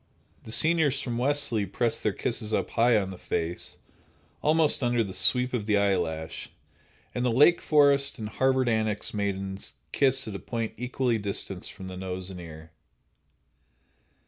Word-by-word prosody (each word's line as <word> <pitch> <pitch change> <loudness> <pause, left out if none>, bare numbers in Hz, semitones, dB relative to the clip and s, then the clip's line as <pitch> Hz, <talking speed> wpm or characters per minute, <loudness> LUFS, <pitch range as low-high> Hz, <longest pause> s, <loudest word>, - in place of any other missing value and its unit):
The 110 - -9
seniors 155 0 +3
from 120 -4 -3
Wellesley 125 -6 +2
press 115 +4 0
their 105 - +1
kisses 110 +1 -2
high 120 +2 +2
up 105 - +1
on 95 - -6
the 95 - -10
face, 85 +1 -3 0.6
almost 155 -1 +2
under 120 -2 +2
the 95 -3 -7
sweep 125 +8 +3
of 110 -4 -2
the 105 -1 +3
eyelash, 85 -6 -1 0.6
and 125 - -2
the 125 - +2
Lake 150 +8 +5
Forest 140 -3 +4
and 110 -3 -5
Harvard 130 +1 +1
Annex 110 -2 -1
maidens 100 -1 -3 0.2
kiss 135 -2 +1
at 110 - -5
a 100 - -5
point 115 -2 -4
equally 125 -1 -1
distant 100 -2 -3
from 95 - -9
the 95 0 -7
nose 95 0 -5
and 90 - -8
ear. 80 -1 -11
110 Hz, 160 wpm, -27 LUFS, 95-130 Hz, 0.6 s, Lake